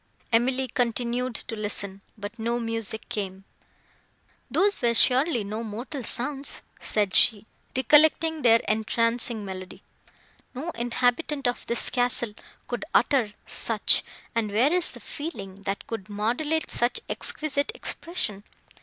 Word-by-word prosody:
Emily 255 +3 +2
continued 245 0 -1
to 225 - -3
listen, 200 -2 -3 0.2
but 210 +3 -7
no 235 +2 0
music 225 -2 -3
came. 195 -4 -4 1.1
"Those 405 -3 +2
were 235 -1 +2
surely 255 0 +4
no 215 +3 -4
mortal 240 +5 -5
sounds!" 275 +5 0 0.2
said 205 -3 0
she, 220 -3 +5 0.3
recollecting 310 +4 +4
their 230 -2 +6
entrancing 230 +1 +1
melody. 185 -1 -8 0.7
"No 310 +7 -4
inhabitant 245 +3 0
of 245 - -3
this 235 - +1
castle 245 -3 +1 0.3
could 245 - -3
utter 245 -8 +3
such; - - +4 0.3
and, 230 -2 0
where 245 +10 +3
is 360 -1 +4
the - - -9
feeling, 200 - -7
that 195 0 -3
could 215 -3 -6
modulate 245 +10 -1
such 240 +1 +1
exquisite 295 +2 -1
expression? 215 - -3
235 Hz, 125 wpm, -26 LUFS, 215-265 Hz, 1.1 s, their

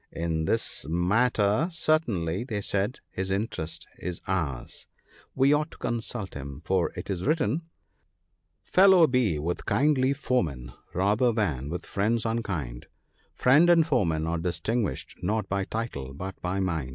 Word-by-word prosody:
'In 80 -1 -2
this 115 +7 0
matter 105 - +2
certainly/ 120 - 0
they 110 -5 -3
said, 100 +3 -1
his 95 0 -3
interest 90 -5 -3
is 90 -1 -4
ours; 80 -10 -3 0.5
we 135 +2 +4
ought 150 +2 +1
to - - -15
consult 115 -3 -3
him; 70 +2 -8
for 95 -1 +1
it 90 +2 -5
is 90 -2 -3
written, 150 -2 +1 0.4
— - - -47
" - - -49
Fellow 190 -2 +8
be 125 - +1
with 85 +4 -3
kindly 135 -2 +3
foemen, 75 - -1 0.2
rather 105 +7 +3
than 80 - -1
with 90 +2 -5
friends 110 +3 0
unkind; 95 - -3 0.5
Friend 145 +7 +5
and 165 -2 +6
foeman 85 - +1
are 85 +1 -1
distinguished 90 +6 -2
not 105 +4 -1
by 100 0 -1
title 70 - -4
but 95 +5 -5
by 90 +2 -1
mind.' 80 -8 -1
100 Hz, 150 wpm, -27 LUFS, 85-125 Hz, 0.5 s, Fellow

